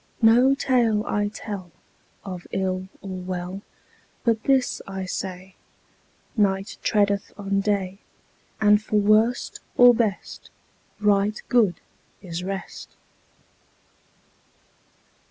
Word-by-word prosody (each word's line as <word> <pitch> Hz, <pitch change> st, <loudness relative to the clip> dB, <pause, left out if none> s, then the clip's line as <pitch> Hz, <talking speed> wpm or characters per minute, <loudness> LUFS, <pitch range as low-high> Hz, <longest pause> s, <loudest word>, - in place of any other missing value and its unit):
No 245 Hz, +5 st, +6 dB
tale 235 Hz, -6 st, +2 dB
I 205 Hz, 0 st, 0 dB
tell 205 Hz, -4 st, -7 dB, 0.5 s
Of 180 Hz, -3 st, -7 dB
ill 185 Hz, -1 st, -2 dB, 0.2 s
or 185 Hz, -2 st, -6 dB
well, 180 Hz, +1 st, -5 dB, 0.6 s
But 225 Hz, -2 st, +1 dB
this 265 Hz, -2 st, +2 dB
I 190 Hz, -1 st, -5 dB
say: 185 Hz, 0 st, -5 dB, 0.8 s
Night 195 Hz, -2 st, 0 dB
treadeth 200 Hz, -2 st, +1 dB
on 200 Hz, -1 st, -1 dB
day, 195 Hz, -2 st, -1 dB, 0.6 s
And 210 Hz, -1 st, +5 dB
for 215 Hz, -, -4 dB
worst 215 Hz, +4 st, +2 dB, 0.2 s
or 245 Hz, 0 st, +8 dB
best 225 Hz, -4 st, -2 dB, 0.5 s
Right 210 Hz, 0 st, +2 dB
good 220 Hz, -7 st, +3 dB, 0.4 s
is 175 Hz, -1 st, -6 dB
rest. 195 Hz, +1 st, -6 dB
200 Hz, 100 wpm, -24 LUFS, 190-220 Hz, 0.8 s, or